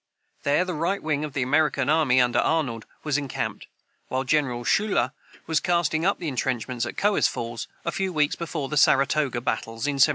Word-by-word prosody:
There 145 +6 +2
the 180 - -3
right 170 +6 -1
wing 150 -1 0
of 150 -2 -5
the 135 - 0
American 145 0 +2
army, 150 -4 +4
under 120 -1 +3
Arnold, 135 -9 0 0.2
was 150 -1 +1
encamped, 140 -3 -4 0.4
while 130 +1 -1
General 130 -4 0
Schuyler 195 - +2 0.3
was 160 -1 +1
casting 170 -1 +1
up 200 -2 0
entrenchments 125 -4 -2
at - - -7
Cohoes 205 0 +3
Falls, 115 0 -5 0.2
a 170 - 0
few 190 +1 -2
weeks 150 -3 +1
before 160 -4 -4
the 150 - -3
Saratoga 135 -2 +3
battles, 115 -2 -3
in 140 -2 0
1777. 130 - +7
145 Hz, 185 wpm, -25 LUFS, 125-160 Hz, 0.4 s, 1777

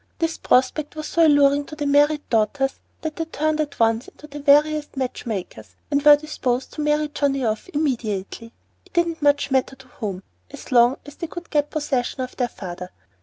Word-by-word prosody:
This 330 -1 -2
prospect 275 +4 +1
was 310 0 -5
so 335 -1 +4
alluring 285 -1 +4
to 305 - -9
the 295 -1 -3
married 290 +1 +3
daughters 255 +5 +1 0.2
that 315 -1 -5
they 325 - -2
turned 310 -1 -1
at 295 -2 -5
once 225 +2 +2
into - - -14
the 295 -1 -9
veriest 295 +1 +3
match 255 -2 -3
makers 110 - -6 0.2
and 285 0 +2
were 295 0 +8
disposed 270 -4 -3
to 305 - -5
many 300 0 +1
Johnnie 275 -3 0
off 220 - -2
immediately, 230 - -3 0.3
it - - -25
didn't 340 -2 0
much 285 -1 +2
matter 265 0 +1
to 265 0 -17
whom, 195 -6 -5 0.3
so 255 - -6
long 240 +2 +5
as 290 -1 -12
they 335 - -4
could 345 +1 -9
get 295 -1 +1
possession 275 -4 -2
of 255 - -5
their 245 - 0
father. 180 -4 -8
285 Hz, 195 wpm, -22 LUFS, 245-300 Hz, 0.3 s, were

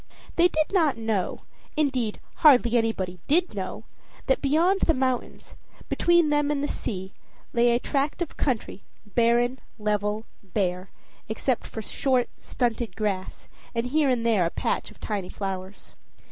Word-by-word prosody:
They 345 +1 +6
did 310 +1 -1
not 320 - +3
know 220 -4 -1 0.4
indeed, 260 -8 0 0.2
hardly 245 -6 +6
anybody 195 -6 0
did 345 +5 +3
know - - -5 0.4
that 265 - +2
beyond 335 +7 +3
the 325 - +3
mountains, 255 -1 -2 0.3
between 345 -2 +4
them 295 0 +2
and 290 -1 0
the - - +1
sea, 190 -7 -4 0.4
lay 240 0 +4
a 235 0 +3
tract 280 +4 -1
of 345 -3 -3
country, 240 -7 -2 0.2
barren, 240 +3 +2 0.2
level, 210 0 -1 0.2
bare, 185 -1 -2 0.4
except 240 +3 -1
for 220 - -6
short, 255 +2 +1
stunted 235 -4 -2
grass, 200 -4 -3 0.3
and 230 +1 0
here 290 +2 +2
and 240 -3 +1
there 220 -6 +4
a 165 - +1
patch - - -2
of - - -17
tiny 200 -4 -3
flowers. 190 -1 -6
240 Hz, 145 wpm, -26 LUFS, 210-285 Hz, 0.4 s, They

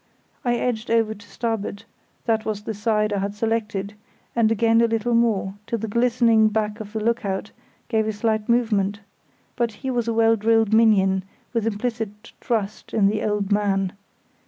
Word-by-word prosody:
I 240 -1 +1
edged 240 -2 -2
over 225 -1 +2
to 205 -1 -16
starboard—that 225 0 -4
was 210 -2 -3
the 220 - -3
side 210 0 0
I 200 - 0
had 200 +1 -3
selected—and 215 0 -2
again 225 +1 +3
a 235 - +4
little 230 +1 0
more, 220 -5 +2
till 230 - -1
the 225 0 -4
glistening 230 -1 +3
back 215 0 -1
of 210 -1 -8
the 220 - -1
look 230 +2 0
out 195 +1 -3 0.4
gave 220 -2 +1
a - - +1
slight 215 0 -1
movement; 210 -4 +1 0.5
but 235 -1 0
he 265 - 0
was 240 -2 -1
a 230 - +1
well 225 0 +4
drilled 225 0 +2
minion, 195 -4 +4 0.3
with 230 -2 0
implicit 225 -1 -4
trust 215 -3 -2
in 200 -2 +4
the 215 +1 -1
"old 210 -1 -1
man". 195 -2 +1
220 Hz, 170 wpm, -23 LUFS, 205-230 Hz, 0.5 s, a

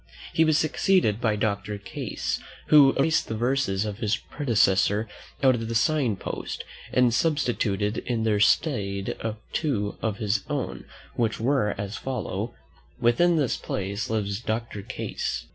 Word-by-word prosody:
He 160 - +4
was 155 -1 +3
succeeded 155 - +2
by 110 -3 +2
Doctor 105 -1 -1
Case, 100 - -4 0.3
who 145 -3 +8
erased 155 +4 +2
the 110 - -3
verses 120 -5 +1
of 105 0 -5
his 105 -2 +1
predecessor 105 -6 +2 0.4
out 130 -1 +6
of 115 -2 -3
the 115 - -3
sign 125 -1 +2
post, - - -5 0.3
and 125 -2 +4
substituted 115 -8 +1
in 115 -3 -2
their 105 -2 +2
stead 100 -5 +1 0.4
two 110 -10 -1
of 110 -3 -1
his 105 -2 0
own, - - -3 0.3
which 115 -3 0
were 120 -3 +1
as 100 +1 -4
follow: 120 -3 -4 0.4
"Within 170 +9 +4
this 145 -6 +1
place 100 +2 -3
Lives 100 -2 -1
Doctor 110 -2 -3
Case." - - -4
110 Hz, 145 wpm, -26 LUFS, 105-135 Hz, 0.4 s, who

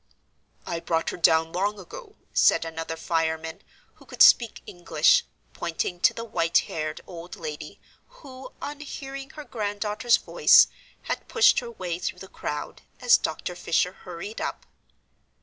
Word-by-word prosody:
"I 170 - -3
brought 165 -1 -1
her - - -7
down 160 -1 +3
long 200 +3 -1
ago," 425 - -11 0.2
said - - +4
another 165 0 -5
fireman, 160 -1 -2 0.3
who - - -20
could - - +4
speak 235 -2 +5
English, 485 - +2 0.3
pointing 175 +1 -3
to - - +5
the 230 - -7
white 170 -7 +1
haired 155 -1 -4
old 175 -1 -9
lady, 150 -2 -7 0.3
who, 270 - -12
on 290 0 -5
hearing 275 -2 -7
her 305 - -8
granddaughter's 210 0 0
voice, - - +6 0.4
had - - -4
pushed 460 0 +5
her 240 - -7
way 180 -6 -5
through 180 - -3
the 190 - -10
crowd, 150 -5 -6 0.2
as 245 -2 +6
Dr. 160 +3 -2
Fisher 175 0 0
hurried 185 +3 -8
up. - - -4
180 Hz, 150 wpm, -25 LUFS, 165-245 Hz, 0.4 s, voice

